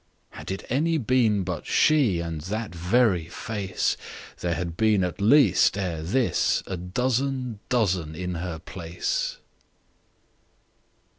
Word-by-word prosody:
Had -, -, -9 dB
it 95 Hz, 0 st, -4 dB
any 160 Hz, +6 st, +1 dB
been 115 Hz, -6 st, +2 dB
but 90 Hz, -2 st, -5 dB
she, 135 Hz, -, +3 dB
And 85 Hz, -2 st, -4 dB
that 110 Hz, -2 st, -3 dB
very 90 Hz, 0 st, +2 dB
face, 100 Hz, -1 st, -2 dB, 0.4 s
There 85 Hz, -1 st, -1 dB
had 85 Hz, 0 st, -4 dB
been 105 Hz, -1 st, +3 dB
at 90 Hz, +2 st, -3 dB
least 105 Hz, -, +5 dB
ere 90 Hz, -5 st, -2 dB
thisA 95 Hz, 0 st, 0 dB, 0.2 s
dozen 125 Hz, 0 st, -1 dB
dozen 95 Hz, -10 st, 0 dB
in 90 Hz, +2 st, -4 dB
her 85 Hz, -1 st, -4 dB
place. 85 Hz, +1 st, -3 dB
95 Hz, 120 wpm, -25 LUFS, 85-125 Hz, 0.4 s, least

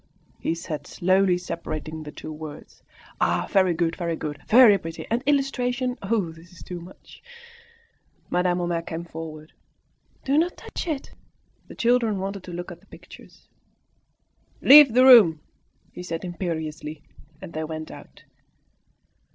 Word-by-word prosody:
he 165 Hz, -, -1 dB
said, 155 Hz, -4 st, -6 dB
slowly 185 Hz, 0 st, +2 dB
separating 160 Hz, -3 st, -6 dB
the 150 Hz, -1 st, -8 dB
two 155 Hz, -, -8 dB
words. 155 Hz, -1 st, -10 dB, 0.4 s
"Ah! -, -, +1 dB
very 185 Hz, -3 st, +3 dB
good! 165 Hz, 0 st, 0 dB
very 170 Hz, -2 st, -2 dB
good! 145 Hz, -2 st, -6 dB
very 230 Hz, -2 st, +7 dB
pretty! 165 Hz, 0 st, -7 dB
And 235 Hz, +2 st, +1 dB
illustrations! 255 Hz, -3 st, 0 dB
Oh, 195 Hz, -4 st, -1 dB
this 165 Hz, +2 st, -16 dB
is 180 Hz, -, -14 dB
too 175 Hz, -1 st, -7 dB
much!" 180 Hz, +3 st, -15 dB, 1.1 s
Madame 180 Hz, 0 st, +1 dB
Homais 175 Hz, -1 st, -1 dB
came 165 Hz, 0 st, -6 dB
forward. 160 Hz, -2 st, -9 dB, 0.7 s
"No, 270 Hz, -, +1 dB
do -, -, +4 dB
not 350 Hz, +2 st, -1 dB
touch -, -, -7 dB
it!" 300 Hz, -5 st, -4 dB, 0.6 s
The -, -, -11 dB
children 235 Hz, -3 st, +2 dB
wanted 195 Hz, +1 st, -4 dB
to 180 Hz, -, -8 dB
look 175 Hz, +1 st, -6 dB
at 175 Hz, -, -11 dB
the -, -, -27 dB
pictures. -, -, -16 dB, 1.1 s
"Leave 280 Hz, -4 st, +8 dB
the 255 Hz, +1 st, +6 dB
room," 210 Hz, -12 st, +8 dB, 0.5 s
he -, -, -9 dB
said 170 Hz, 0 st, -5 dB
imperiously; 160 Hz, -3 st, -5 dB, 0.4 s
and 165 Hz, -, -10 dB
they 155 Hz, -, -3 dB
went 155 Hz, 0 st, -6 dB
out. -, -, -14 dB
175 Hz, 150 wpm, -24 LUFS, 160-220 Hz, 1.1 s, Leave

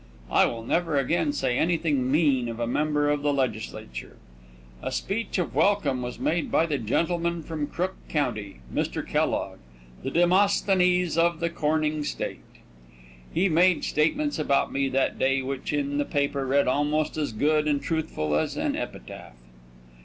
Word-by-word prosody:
I -, -, +5 dB
will 115 Hz, -1 st, -5 dB
never 165 Hz, +4 st, 0 dB
again 145 Hz, +2 st, +1 dB
say 135 Hz, -4 st, 0 dB
anything 155 Hz, -6 st, +1 dB
mean 140 Hz, -6 st, +2 dB
of 115 Hz, 0 st, -6 dB
a 120 Hz, -, 0 dB
member 145 Hz, +3 st, +1 dB
of 145 Hz, -1 st, 0 dB
the 145 Hz, 0 st, +1 dB
legislature. 110 Hz, -, -4 dB, 0.6 s
A -, -, -3 dB
speech 220 Hz, +3 st, -2 dB
of 180 Hz, -, -2 dB
welcome 150 Hz, -11 st, +2 dB
was 125 Hz, 0 st, -5 dB
made 165 Hz, 0 st, -1 dB
by 165 Hz, -, +3 dB
the 150 Hz, -4 st, -1 dB
gentleman 170 Hz, +8 st, 0 dB
from 155 Hz, -2 st, -3 dB
Crook 185 Hz, +5 st, -2 dB, 0.2 s
county, 110 Hz, -, -2 dB
Mr. -, -, -2 dB
Kellogg, -, -, -1 dB, 0.4 s
the -, -, -3 dB
Demosthenes 180 Hz, -1 st, +3 dB
of 170 Hz, -1 st, +2 dB
the 170 Hz, 0 st, -1 dB
coming 155 Hz, -1 st, 0 dB
state. -, -, -4 dB, 0.9 s
He 180 Hz, +4 st, +2 dB
made 180 Hz, +1 st, +3 dB
statements 280 Hz, -, 0 dB
about 140 Hz, -2 st, +1 dB
me 135 Hz, 0 st, +1 dB
that 135 Hz, +1 st, 0 dB
day 135 Hz, 0 st, +2 dB
which 135 Hz, 0 st, -4 dB
in 145 Hz, -1 st, -1 dB
the 145 Hz, -, +1 dB
paper 140 Hz, -1 st, -1 dB
read 140 Hz, +2 st, +3 dB
almost 150 Hz, +3 st, +1 dB
as 150 Hz, -4 st, -1 dB
good 150 Hz, +7 st, +1 dB
and 145 Hz, -1 st, +2 dB
truthful 155 Hz, -, -2 dB
as 75 Hz, -, -1 dB
an -, -, 0 dB
epitaph. -, -, -7 dB
150 Hz, 160 wpm, -26 LUFS, 135-170 Hz, 0.9 s, I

